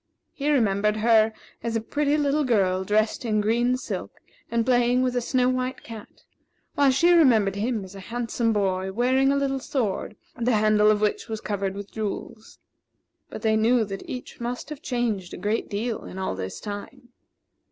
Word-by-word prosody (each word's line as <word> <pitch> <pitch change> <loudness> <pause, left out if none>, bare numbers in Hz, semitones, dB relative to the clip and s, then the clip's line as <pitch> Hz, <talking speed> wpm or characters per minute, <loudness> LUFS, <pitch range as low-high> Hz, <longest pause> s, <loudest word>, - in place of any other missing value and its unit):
He 285 +1 -2
remembered 210 -6 +2
her 220 0 +4 0.3
as 230 -1 -3
a - - +2
pretty 290 +6 0
little 295 0 +1
girl 190 -7 +2
dressed 215 +4 +1
in 215 -3 +1
green 240 +4 +2
silk - - -5 0.4
and 230 -1 0
playing 245 0 +3
with 250 -1 0
a 245 - +1
snow 250 +1 +1
white 255 0 -2
cat; 225 -2 -11 0.5
while 280 -1 +4
she 335 +7 +4
remembered 230 - +5
him 215 0 -2
as 190 - -12
a 195 - -9
handsome 230 +2 -1
boy, 190 -2 0
wearing 260 +5 +2
a - - +2
little 275 -1 0
sword, 230 -6 -2 0.2
the 245 0 0
handle 215 0 +4
of 210 -1 +2
which 210 +1 -1
was 220 -1 -3
covered 195 -2 -3
with 200 0 -8
jewels. 215 0 -6 0.7
But - - -8
they 220 -1 +3
knew 225 +1 +3
that 195 -1 -7
each 250 - -7
must 245 +4 -4
have 300 -1 -7
changed 230 - -2
a - - -9
great 210 +5 -2
deal 220 +3 -3
in - - -9
all 190 - -2
this 95 0 -5
time. 225 +5 -8
225 Hz, 185 wpm, -25 LUFS, 210-255 Hz, 0.7 s, remembered